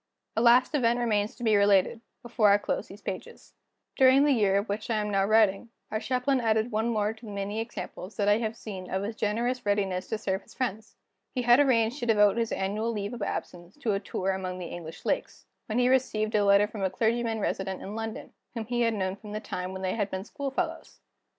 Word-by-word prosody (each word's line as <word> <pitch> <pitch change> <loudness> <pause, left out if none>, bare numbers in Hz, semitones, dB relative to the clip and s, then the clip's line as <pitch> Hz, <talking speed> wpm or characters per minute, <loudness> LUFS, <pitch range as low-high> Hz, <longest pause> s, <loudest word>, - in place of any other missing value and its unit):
A 225 - +1
last 245 +4 +5
event 240 -4 +2
remains 215 -3 0
to 245 - -9
be 220 -2 +4
related, 200 +2 +3 0.2
before 230 -3 +3
I 200 - +6
close - - -3
these 200 +1 -13
pages. 185 - -7 0.4
During 265 +1 +6
the 295 - +4
year 205 -6 +3
of 200 +3 -1
which 210 +3 -4
I 230 - +1
am 210 -1 -1
now 195 -1 +2
writing, 215 +1 +3 0.2
our 215 - -1
Chaplain 255 +2 0
added 220 +1 +1
one 220 +2 0
more 215 -2 0
to 225 +1 -15
the - - -7
many 200 +2 -3
examples 225 -3 -6
that 205 -2 +1
I 205 +1 +4
have 220 -1 -2
seen 190 -5 -7
of 190 +1 -1
his 215 +2 -4
generous 235 +4 -1
readiness 195 -3 0
to 220 - -2
serve 190 -1 -2
his - - -19
friends. 220 -4 -3 0.4
He 250 - 0
had 240 +2 +6
arranged 250 -2 +3
to 240 - -3
devote 210 -1 +4
his 230 -1 0
annual 210 +4 -1
leave 205 0 -4
of 240 - -7
absence 175 -1 -5
to 235 -8 -1
a 195 - 0
tour 195 -2 -2
among 185 -1 -4
the 180 - -6
English 165 -1 -8
Lakes, - - -2 0.2
when 220 - -2
he 250 0 +4
received 225 -4 +1
a 210 -1 +3
letter 200 +1 +5
from 210 -1 -8
a 190 - +1
clergyman 225 +3 0
resident 190 -2 -2
in 200 - -6
London, 225 0 -6 0.2
whom 225 -1 -3
he 240 +2 -1
had 230 -1 +2
known 190 -2 -1
from 210 +1 -10
the 215 - -2
time 180 -3 -5
when 190 0 -6
they 185 - 0
had 205 -3 -1
been 190 +1 -4
school 280 +3 -4
fellows. 330 +4 -4
215 Hz, 235 wpm, -28 LUFS, 200-235 Hz, 0.4 s, I